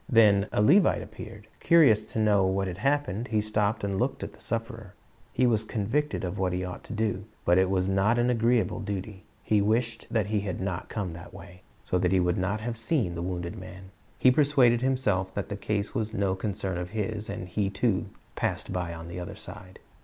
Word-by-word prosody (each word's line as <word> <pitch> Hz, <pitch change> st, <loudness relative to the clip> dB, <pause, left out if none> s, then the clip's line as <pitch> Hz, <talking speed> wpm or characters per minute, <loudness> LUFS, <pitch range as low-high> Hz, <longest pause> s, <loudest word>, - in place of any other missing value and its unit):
Then 105 Hz, -5 st, +5 dB
a 105 Hz, -, +2 dB
Levite 180 Hz, -, +5 dB
appeared. 105 Hz, 0 st, -10 dB
Curious 115 Hz, -10 st, +4 dB
to -, -, -5 dB
know 105 Hz, -2 st, +4 dB
what 95 Hz, +1 st, +1 dB
had 90 Hz, 0 st, -5 dB
happened, 135 Hz, -3 st, 0 dB
he 110 Hz, -1 st, +1 dB
stopped 105 Hz, 0 st, 0 dB
and 100 Hz, -1 st, -1 dB
looked -, -, -1 dB
at -, -, -6 dB
the -, -, -18 dB
sufferer. 115 Hz, -3 st, -4 dB, 0.4 s
He 130 Hz, -, +2 dB
was 110 Hz, -3 st, +2 dB
convicted 115 Hz, +6 st, -1 dB
of 95 Hz, +2 st, -3 dB
what 95 Hz, -1 st, 0 dB
he 90 Hz, +1 st, -2 dB
ought 90 Hz, -, -7 dB
to -, -, -7 dB
do, 105 Hz, -3 st, -1 dB, 0.2 s
but 90 Hz, +1 st, +5 dB
it 95 Hz, 0 st, +3 dB
was 95 Hz, -1 st, +1 dB
not 100 Hz, +4 st, +2 dB
an 120 Hz, +1 st, +3 dB
agreeable 115 Hz, 0 st, +2 dB
duty. 100 Hz, -1 st, -5 dB, 0.2 s
He 105 Hz, -1 st, +2 dB
wished 115 Hz, +3 st, 0 dB
that 110 Hz, -4 st, +1 dB
he 105 Hz, 0 st, 0 dB
had 100 Hz, -2 st, -4 dB
not 95 Hz, -2 st, -3 dB
come 100 Hz, -6 st, -3 dB
that 85 Hz, 0 st, -11 dB
way, 90 Hz, +1 st, -12 dB, 0.2 s
so 90 Hz, -, 0 dB
that 90 Hz, 0 st, +1 dB
he 95 Hz, -, +4 dB
would 90 Hz, 0 st, +1 dB
not 100 Hz, +4 st, -1 dB
have 115 Hz, +1 st, -4 dB
seen 115 Hz, -, 0 dB
the 85 Hz, -, -4 dB
wounded 90 Hz, -1 st, -4 dB
man. 95 Hz, +1 st, -11 dB, 0.3 s
He 130 Hz, -, +5 dB
persuaded 130 Hz, -4 st, +4 dB
himself 125 Hz, -8 st, 0 dB
that 100 Hz, -, -3 dB
the 100 Hz, -, -3 dB
case 105 Hz, 0 st, -2 dB
was 110 Hz, -1 st, -2 dB
no 100 Hz, -1 st, +1 dB
concern 95 Hz, -2 st, -3 dB
of 90 Hz, 0 st, -5 dB
his, 110 Hz, 0 st, -3 dB
and 90 Hz, -, -5 dB
he 100 Hz, +2 st, -1 dB
too 100 Hz, -1 st, 0 dB
" -, -, -34 dB
passed -, -, -2 dB
by 90 Hz, -2 st, -3 dB
on 80 Hz, 0 st, -8 dB
the 85 Hz, +1 st, -6 dB
other 90 Hz, -, -6 dB
side." 95 Hz, 0 st, -11 dB
100 Hz, 220 wpm, -27 LUFS, 95-115 Hz, 0.4 s, Then